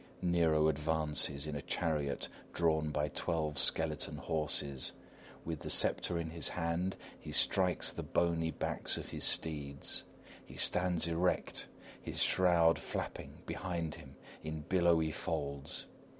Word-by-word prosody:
[_Nero 80 -3 +3
advances 75 -2 +1
in 75 -1 -5
a 70 - -4
chariot 75 -3 -2 0.3
drawn 80 -2 +1
by 75 0 -1
twelve 75 -2 -1
skeleton 75 +2 +2
horses. 75 -4 -1 0.5
With 80 -2 -4
the - - -6
sceptre 85 - +2
in 80 -1 -4
his 85 -3 +1
hand, 90 +2 -2 0.2
he - - -9
strikes 90 -2 +4
the - - -6
bony 85 -1 0
backs 80 - -2
of - - -7
his - - -1
steeds. 70 -3 +1 0.4
He - - -14
stands 90 -2 +3
erect, 85 +2 -1 0.3
his - - -4
shroud 85 -3 +4
flapping - - -6
behind 85 -4 -4
him 65 +1 -12 0.3
in 80 0 -5
billowy 85 -1 +2
folds. 70 -1 -3
80 Hz, 130 wpm, -34 LUFS, 75-85 Hz, 0.5 s, strikes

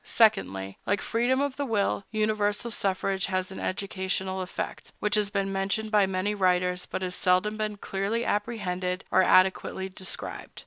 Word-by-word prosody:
Secondly, 95 - +2
like 205 0 +2
freedom 245 +3 +1
of 285 -2 -1
the 285 - -1
will, 205 -3 0
universal 215 +1 0
suffrage 195 -1 0
has 185 0 -1
an 190 - -7
educational 190 -1 -2
effect, 185 - -5
which 210 0 0
has 210 -1 +3
been 195 -1 -1
mentioned 200 +3 -1
by 205 -3 +4
many 190 +2 0
writers, 180 -2 +1
but 190 - -3
has 180 -1 -2
seldom 185 +4 +2
been 215 -1 -2
clearly 200 +4 -2
apprehended 190 -4 -1
or 185 - +5
adequately 190 0 +3
described. 185 0 -5
195 Hz, 155 wpm, -27 LUFS, 185-210 Hz, -, or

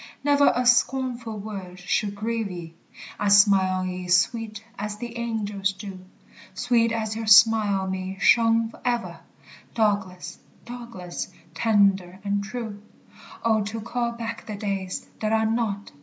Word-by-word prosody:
Never 285 0 +5
a 250 +1 0
scornful 245 -2 +1
word 195 -3 -7
should 200 +2 -1
grieve 225 0 -2
ye, 170 -3 -8 0.5
I 205 - 0
'd 200 - +6
smile 195 -2 +5
on 185 - -2
ye 180 0 -5
sweet 215 +4 +1 0.2
as 210 0 -4
the 240 +1 -7
angels 210 -4 -2
do; 195 -1 -8 0.6
Sweet 235 +1 +2
as 220 -1 -2
your 225 0 -4
smile 215 -2 +6
on 190 0 -3
me 190 0 -4
shone 230 +1 +4
ever, 240 -1 -2 0.6
Douglas, 200 -5 -1 0.3
Douglas, 235 -7 -7 0.3
tender 195 -2 +2
and 200 0 -1
true. 215 -1 -6 0.6
Oh, 220 -1 +3
to 220 +2 -4
call 235 +1 -2
back 230 -1 -6
the 215 - -4
days 195 -2 -3
that 215 0 0
are 220 0 +3
not! 220 -3 -1
215 Hz, 145 wpm, -25 LUFS, 195-230 Hz, 0.6 s, d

